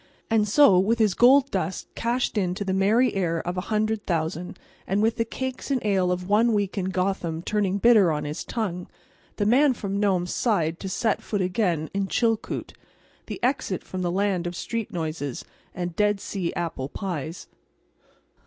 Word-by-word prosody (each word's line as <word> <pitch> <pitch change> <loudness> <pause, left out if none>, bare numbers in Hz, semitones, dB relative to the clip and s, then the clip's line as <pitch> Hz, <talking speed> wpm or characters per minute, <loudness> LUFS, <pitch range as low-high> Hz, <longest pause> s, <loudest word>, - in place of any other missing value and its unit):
And 215 -2 +3
so, 205 -4 +6
with 220 +5 +2
his 215 -4 +3
gold 265 +5 +5
dust 190 -1 -3
cashed 240 +2 -1
in 180 -4 0
to 200 - -4
the 190 - -1
merry 215 +7 +3
air 170 -4 0
of 175 +1 -2
a 180 - -1
hundred 215 0 0
thousand, 170 +1 -2 0.3
and 195 +2 +1
with 225 +2 +1
the 230 - +1
cakes 260 +4 -5
and 270 -2 +1
ale 190 -3 +2
of 180 0 -3
one 220 +3 +3
week 205 -2 0
in 195 -3 -1
Gotham 185 -3 -2
turning 200 -2 0
bitter 210 -5 +5
on 150 -1 -2
his 150 +1 -4
tongue, 180 -6 -3 0.5
the 205 - -1
Man 260 +5 +4
from 200 -2 -3
Nome 190 -4 +2
sighed 170 -5 0
to 190 - -5
set 220 +4 0
foot 205 -3 -2
again 180 -5 0
in 195 0 -1
Chilkoot, 225 +1 -1 0.5
the - - -6
exit 250 -8 0
from 185 - -5
the 175 - 0
land 190 -2 0
of 175 - -5
street 230 +4 -3
noises 155 -6 -4 0.3
and 175 -1 -4
Dead 210 0 +2
Sea 190 -3 -3
apple 165 -6 -3
pies. 170 -4 -5
195 Hz, 180 wpm, -25 LUFS, 175-220 Hz, 0.5 s, so